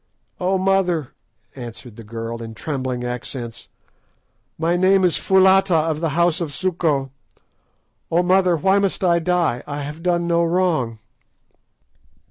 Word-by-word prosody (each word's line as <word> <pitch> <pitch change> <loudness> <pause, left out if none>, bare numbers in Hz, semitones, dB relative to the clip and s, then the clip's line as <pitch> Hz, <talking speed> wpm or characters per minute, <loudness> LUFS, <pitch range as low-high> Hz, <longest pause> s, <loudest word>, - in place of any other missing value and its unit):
"Oh, 185 +1 +1
mother," 185 -6 0 0.4
answered 120 -2 -9
the 115 - -11
girl, 115 +1 -6
in 115 -1 -8
trembling 130 -3 -3
accents, 120 -1 -6 0.9
"my 165 +2 +1
name 190 +1 +3
is 175 - +2
Foulata, 190 -1 +4
of 155 -1 0
the 165 -2 -1
house 175 0 +2
of 150 -5 -4
Suko. 160 -7 0 1.0
Oh, 170 +2 +2
mother, 185 -1 +3
why 190 +5 +3
must 195 -1 -1
I 170 -2 +3
die? 170 -7 0
I 145 0 -4
have 150 +3 -7
done 175 -1 0
no 170 0 +2
wrong!" 165 -10 0
165 Hz, 135 wpm, -21 LUFS, 130-180 Hz, 1.0 s, Foulata